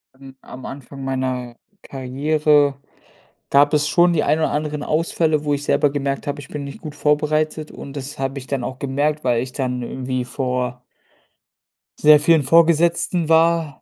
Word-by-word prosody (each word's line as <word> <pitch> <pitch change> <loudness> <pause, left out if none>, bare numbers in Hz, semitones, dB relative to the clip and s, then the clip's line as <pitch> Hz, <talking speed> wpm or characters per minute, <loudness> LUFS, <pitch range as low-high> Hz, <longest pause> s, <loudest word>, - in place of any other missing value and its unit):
Am 135 0 -14
am 130 0 -11
Anfang 135 0 -9
meiner 130 -2 -3 0.2
Karriere 145 +2 +1 0.7
gab 145 +2 +4
es 150 0 +2
schon 175 +1 +4
die 155 - +1
ein 155 - +2
oder 155 - 0
anderen 150 0 -3
Ausfälle, 155 -1 0
wo 145 - +1
ich 145 - -2
selber 145 0 +2
gemerkt 140 0 -3
habe, 145 0 -3
ich 140 - -13
bin 150 -1 -5
nicht 140 - -9
gut 150 -1 -8
vorbereitet 155 +1 0
und 140 - -10
das 140 0 -7
habe 135 +1 -3
ich 130 - -12
dann 135 -3 -2
auch 130 -1 -5
gemerkt, 145 +3 -1
weil 120 -2 +1
ich 125 0 -6
dann 125 -2 -2
irgendwie 130 0 -4
vor 125 -1 -3 1.2
sehr 150 0 +7
vielen 160 0 +3
Vorgesetzten 170 +2 +3
war. 165 -2 +2
145 Hz, 170 wpm, -20 LUFS, 130-155 Hz, 1.2 s, sehr